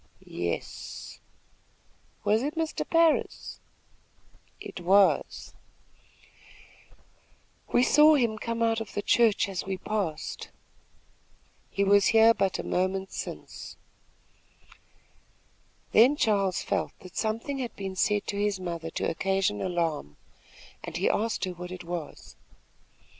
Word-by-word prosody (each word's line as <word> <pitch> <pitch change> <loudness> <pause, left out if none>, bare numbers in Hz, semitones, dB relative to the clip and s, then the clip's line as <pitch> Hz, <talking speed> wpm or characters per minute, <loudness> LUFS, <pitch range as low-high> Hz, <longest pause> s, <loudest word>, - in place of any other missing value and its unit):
"Yes." 85 -1 -5 1.0
"Was 210 +2 +2
it 295 +5 -3
Mr. 320 -1 -3
Parris?" 330 -1 +1 1.0
"It - - -8
was." 195 +3 +2 2.2
"We 245 - +4
saw 300 +3 +6
him 230 -6 +1
come 230 0 -2
out 225 0 +1
of 220 - -8
the 205 - -2
church 225 -3 +3
as 190 -2 -4
we 190 -1 -3
passed." 185 -6 -4 1.2
"He 200 - 0
was 200 0 +5
here 225 0 +6
but 195 -4 0
a - - -4
moment 190 +1 -1
since." - - -7 2.1
Then 250 +7 +6
Charles 200 -8 +1
felt - - -2
that 185 -1 -13
something 230 +6 -2
had 245 -3 -4
been 195 -1 -5
said 205 +2 +1
to 200 - -3
his 205 -2 0
mother 170 -3 -5
to - - -2
occasion 190 - 0
alarm, 165 - -2 0.7
and - - -5
he - - +2
asked 220 -1 -1
her 185 - -4
what 180 0 -8
it 185 -1 -7
was. 170 -2 -7
200 Hz, 120 wpm, -27 LUFS, 180-225 Hz, 2.2 s, saw